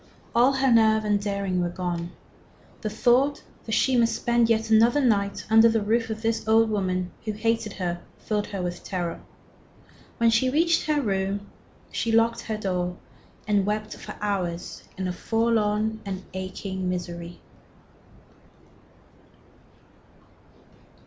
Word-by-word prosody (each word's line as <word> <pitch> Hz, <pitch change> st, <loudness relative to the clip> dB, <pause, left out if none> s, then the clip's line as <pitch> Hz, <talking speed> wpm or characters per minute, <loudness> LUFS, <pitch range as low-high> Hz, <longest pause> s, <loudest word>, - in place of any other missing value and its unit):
All 245 Hz, +4 st, +4 dB
her 265 Hz, -1 st, +2 dB
nerve 220 Hz, -1 st, +4 dB
and 205 Hz, -1 st, +1 dB
daring 200 Hz, -3 st, -1 dB
were 175 Hz, -, 0 dB
gone. 175 Hz, -1 st, -3 dB, 0.7 s
The 215 Hz, -, -2 dB
thought 255 Hz, +6 st, +2 dB, 0.2 s
that 220 Hz, -, -2 dB
she 260 Hz, +4 st, +3 dB
must 230 Hz, -2 st, +3 dB
spend 235 Hz, -1 st, +2 dB
yet 225 Hz, 0 st, +1 dB
another 230 Hz, +5 st, +5 dB
night 205 Hz, -7 st, +1 dB
under 225 Hz, +1 st, +6 dB
the 225 Hz, 0 st, +2 dB
roof 225 Hz, +2 st, +1 dB
of 220 Hz, 0 st, -5 dB
this 225 Hz, 0 st, -1 dB
old 225 Hz, 0 st, +4 dB
woman 185 Hz, -3 st, -1 dB
who 215 Hz, -, -3 dB
hated 225 Hz, -1 st, -1 dB
her 175 Hz, -2 st, -3 dB, 0.2 s
filled 210 Hz, -1 st, -2 dB
her 195 Hz, -3 st, -4 dB
with 175 Hz, 0 st, -4 dB
terror. 175 Hz, -3 st, -3 dB, 1.0 s
When 230 Hz, 0 st, +4 dB
she 230 Hz, +3 st, +3 dB
reached 330 Hz, +4 st, +2 dB
her 305 Hz, -1 st, +2 dB
room 200 Hz, -1 st, -2 dB, 0.4 s
she 230 Hz, -, -1 dB
locked 230 Hz, +1 st, +3 dB
her 220 Hz, -2 st, -4 dB
door 180 Hz, -3 st, -2 dB, 0.5 s
and 205 Hz, -2 st, +3 dB
wept 210 Hz, +2 st, -2 dB
for -, -, -9 dB
hours 185 Hz, -4 st, -3 dB
in 185 Hz, -1 st, -2 dB
a 180 Hz, -, -2 dB
forlorn 220 Hz, 0 st, 0 dB
and 195 Hz, -1 st, -5 dB
aching 190 Hz, 0 st, -4 dB
misery. 175 Hz, -1 st, -5 dB
215 Hz, 140 wpm, -25 LUFS, 190-230 Hz, 1.0 s, under